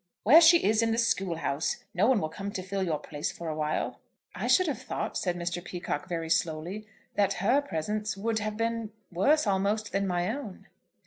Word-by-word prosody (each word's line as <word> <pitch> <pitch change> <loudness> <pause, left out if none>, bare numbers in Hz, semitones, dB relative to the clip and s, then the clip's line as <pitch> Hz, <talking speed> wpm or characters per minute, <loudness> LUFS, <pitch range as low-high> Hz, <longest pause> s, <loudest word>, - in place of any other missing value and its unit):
"Where 300 +10 +8
she 335 +1 +7
is 215 +2 +3
in 230 - +2
the 225 - 0
school 195 -6 +1
house. 155 -2 -2
No 195 +5 +3
one 255 -4 +4
will 155 - -2
come 195 +5 -6
to 185 - -4
fill 195 +1 -3
your 165 -5 0
place 150 0 -4
for 170 -1 -6
a 155 - -3
while." 155 0 -2 0.3
"I - - -3
should 370 - +5
have 290 -9 -2
thought," - - -4
said 180 -2 -1
Mr. 175 0 -3
Peacocke 175 -3 -4
very 165 -2 -2
slowly, 170 +6 -1 0.3
"that 200 -1 +2
her 220 +10 +2
presence 210 - -3
would 220 +2 -1
have 215 0 -3
been 230 -1 -2 0.2
worse 280 - +3
almost, 205 +2 0
than 195 0 0
my 180 +4 0
own." 235 -10 -8
195 Hz, 205 wpm, -28 LUFS, 175-225 Hz, 0.3 s, Where